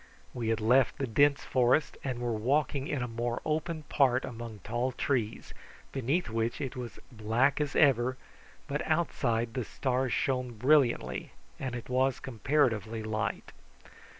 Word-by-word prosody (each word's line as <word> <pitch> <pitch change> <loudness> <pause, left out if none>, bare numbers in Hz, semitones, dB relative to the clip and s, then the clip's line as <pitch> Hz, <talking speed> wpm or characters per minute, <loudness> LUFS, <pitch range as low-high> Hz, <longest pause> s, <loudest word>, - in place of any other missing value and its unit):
We 120 -3 -3
had 115 0 +1
left 120 +3 +3
the 135 - -1
dense 140 +4 +3
forest, 130 +4 +2
and 130 -3 -2
were 120 -1 -1
walking 135 +5 0
in 135 -4 -1
a - - -2
more 120 +1 -2
open 155 +1 -2
part 135 -4 +2
among 115 -3 -7
tall 120 +4 -1
trees, 120 -4 -2 0.4
beneath 140 +7 0
which 115 +1 -1
it 135 -4 -4
was 125 -3 -6
black 120 +6 +1
as 145 -2 -2
ever, 130 -3 +4 0.5
but 145 +1 -2
outside 120 -8 0
the 125 -1 -2
stars 130 +2 -1
shone 125 -2 0
brilliantly, 120 - +2 0.3
and 130 -2 -3
it 120 - -6
was 130 +1 +1
comparatively 115 -4 0
light. 110 +1 -3
125 Hz, 150 wpm, -30 LUFS, 115-135 Hz, 0.5 s, ever